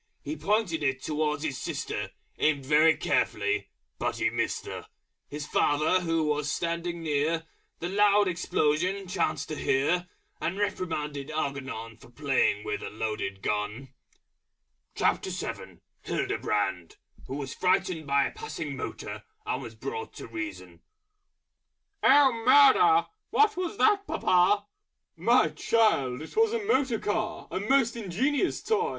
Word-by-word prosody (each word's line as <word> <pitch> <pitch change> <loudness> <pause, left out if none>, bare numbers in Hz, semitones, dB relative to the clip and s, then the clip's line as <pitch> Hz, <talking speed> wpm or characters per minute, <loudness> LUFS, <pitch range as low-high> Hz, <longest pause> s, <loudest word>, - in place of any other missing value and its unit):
He 310 - -4
pointed 205 - 0
it 135 -2 -1
towards 150 -1 -1
his 145 -4 -3
sister, - - -3 0.3
Aimed 145 -3 +1
very 155 +3 +5
carefully, 415 0 0 0.3
but - - -2
Missed - - -1
her! - - -7 0.4
His 145 0 -5
Father, 150 +5 +2
who 165 -2 0
was 150 -1 0
standing 170 +1 -2
near, 160 +2 0 0.3
The 170 - -4
Loud 205 +1 +4
Explosion 180 +2 0
chanced 160 -5 -1
to 155 - -3
Hear, 170 +7 +1 0.3
And 180 +4 -2
reprimanded 150 -8 -2
Algernon 135 -7 -4
For 115 - -17
playing 120 -5 +1
with 105 - -3
a - - -5
Loaded 105 -3 -4
Gun. 105 +6 -2 1.0
HILDEBRAND, 95 -5 -2 0.3
Who 135 - -4
was 140 -1 -5
frightened 180 -3 0
by 140 0 +3
a - - -3
Passing 445 0 -6
Motor, - - -6 0.2
and 430 - -2
was - - -9
brought 450 +1 -6
to - - -8
Reason. 310 -2 -7 1.2
"Oh, 275 -1 +6
Murder! 420 - +6 0.2
What 430 0 +3
was 365 +2 -3
that, 410 -2 +3
Papa!" 185 +3 +3 0.5
"My - - +4
child, 155 - +1
It - - -11
was 450 0 +3
a 460 -2 -1
Motor 270 - +2
Car, 215 +1 -2
A - - -2
Most 235 +3 +2
Ingenious 250 - 0
Toy! 445 +1 +1
170 Hz, 130 wpm, -28 LUFS, 145-235 Hz, 1.2 s, Oh